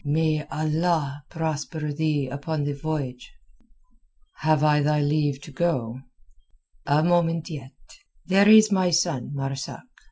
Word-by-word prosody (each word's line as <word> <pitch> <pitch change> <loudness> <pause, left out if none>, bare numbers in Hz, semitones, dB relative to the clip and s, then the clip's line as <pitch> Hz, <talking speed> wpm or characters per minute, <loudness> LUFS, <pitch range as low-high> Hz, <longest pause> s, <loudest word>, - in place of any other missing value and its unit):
"May 155 +1 0
Allah 155 -2 -1
prosper 155 -1 -3
thee 150 -2 0
upon 145 +3 -3
the 145 0 -2
voyage." 140 -4 -5 1.1
"Have 155 -1 +2
I 150 -1 +4
thy 150 +1 +2
leave 145 -1 0
to 150 - -11
go?" 130 -6 -1 0.9
"A 145 +2 +3
moment 170 -1 +1
yet. 135 -4 -8 0.5
There 195 +3 +4
is 215 0 +8
my 185 -2 +2
son 165 -7 0
Marzak. 135 0 -5
150 Hz, 125 wpm, -24 LUFS, 140-165 Hz, 1.1 s, is